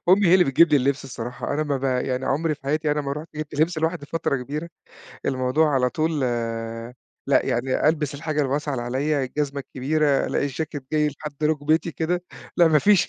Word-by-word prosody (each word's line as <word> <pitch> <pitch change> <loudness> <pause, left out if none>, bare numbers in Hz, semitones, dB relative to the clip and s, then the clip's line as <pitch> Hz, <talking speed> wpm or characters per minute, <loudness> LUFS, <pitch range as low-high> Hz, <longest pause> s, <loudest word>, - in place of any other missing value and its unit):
أمي 195 +1 +6
هي 170 - +6
اللي 185 -1 +6
بتجيب 150 +5 +5
لي 150 - +6
اللِبس 140 +1 0
الصراحة، 125 +1 -5
أنا 155 - +1
ما 145 -2 -1
ب 135 - -5
يعني 130 0 0
عُمري 155 +3 +1
في 150 - -24
حياتي 150 +2 0
أنا 150 - +1
ما 140 -1 -3
رُحت 150 +3 -6
جِبت 155 -1 -5
لِبس 165 0 +2
لوحدي 160 -2 -1
فترة 165 -3 -1
كبيرة، 145 +6 -5 0.6
الموضوع 130 +4 +2
على 125 -1 +3
طول 155 +2 0
آآ، 115 0 -3 0.3
لأ 140 - +3
يعني 130 +3 +1
ألبِس 150 -2 0
الحاجة 150 0 -1
الواسعة 145 +2 -1
اللي 125 -3 -2
عليَّ، 135 +3 0
الجزمة 140 +1 -2
الكبيرة، 140 +2 +1
لأ - - -1
الجاكيت 145 0 -3
جاي 150 -1 +3
لحد 150 0 -8
رُكبتي 155 +2 +1
كده، 175 +2 -1 0.3
لأ 170 -2 +6
ما 155 - +5
فيش 200 +4 +4
145 Hz, 200 wpm, -24 LUFS, 130-155 Hz, 0.6 s, أمي